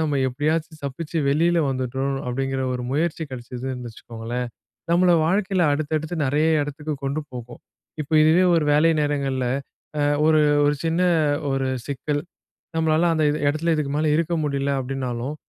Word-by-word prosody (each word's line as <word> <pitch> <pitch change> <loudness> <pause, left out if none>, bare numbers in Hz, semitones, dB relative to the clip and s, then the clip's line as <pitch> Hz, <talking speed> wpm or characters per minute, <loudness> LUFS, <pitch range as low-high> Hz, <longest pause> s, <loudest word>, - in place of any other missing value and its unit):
நம்ம 145 -3 0
எப்படியாச்சும் 155 +4 -2
தப்பிச்சு 160 +4 -4
வெளில 170 +4 +3
வந்துட்டோம் 130 +1 -2
அப்டிங்குற 135 +1 -2
ஒரு 125 - -3
முயற்சி 160 +2 0
கிடைச்சதுன்னு 125 0 -6
வச்சுக்கோங்களேன், 120 +2 -5 0.4
நம்மள 180 +1 +4 0.2
வாழ்க்கைல 190 0 +1
அடுத்தடுத்து 155 +2 -2
நெறைய 150 +4 +2
எடத்துக்கு 150 +1 -4
கொண்டு 140 +3 -1
போகும். 120 -1 -8 0.4
இப்போ 150 - -11
இதுவே 160 +4 +5
ஒரு 155 - +2
வேலை 155 +3 +5
நேரங்கள்ல 135 -3 -1 0.5
அ - - +2 0.2
ஒரு 155 -1 +5 0.3
ஒரு 145 - +3
சின்ன 165 +2 +1 0.5
ஒரு 135 0 0 0.2
சிக்கல். 145 +1 -2 0.5
நம்மளால 160 +1 +3
அந்த 155 -1 +2
எ - - 0 0.2
எடத்துல 160 +3 0
இதுக்கு 150 -2 -1
மேல 155 0 +1
இருக்க 170 +1 0
முடில 140 -1 -1
அப்டின்னாலும், 130 +1 -3
145 Hz, 145 wpm, -23 LUFS, 130-160 Hz, 0.5 s, இதுவே